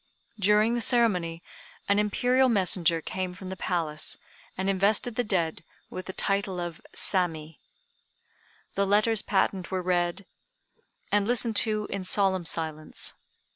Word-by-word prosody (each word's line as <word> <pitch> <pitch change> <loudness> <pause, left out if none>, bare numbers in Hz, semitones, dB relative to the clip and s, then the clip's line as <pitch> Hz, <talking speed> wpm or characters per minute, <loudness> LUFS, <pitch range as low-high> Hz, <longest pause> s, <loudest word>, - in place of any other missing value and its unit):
During 210 +3 +3
the 240 - 0
ceremony, 180 -9 +2 0.4
an 200 +1 +3
Imperial 250 +5 +2
messenger 180 -6 +2
came 185 +2 -4
from 185 0 -8
the - - -4
Palace, 160 -5 0 0.4
and 190 +1 -2
invested 200 +5 +2
the 245 - 0
dead 170 -7 -1 0.3
with 185 - -7
the 190 - -5
title 195 -2 -1
of 175 -2 -5
Sammi. 165 -5 -1 1.1
The 200 0 0
letters 210 +2 +3
patent 195 -2 0
were 185 -1 -2
read, 175 +1 0 0.9
and 205 0 +2
listened 235 -2 +1
to 215 -2 +2
in 195 -1 -3
solemn 190 -2 +2
silence. 155 -2 -3
190 Hz, 135 wpm, -27 LUFS, 175-210 Hz, 1.1 s, During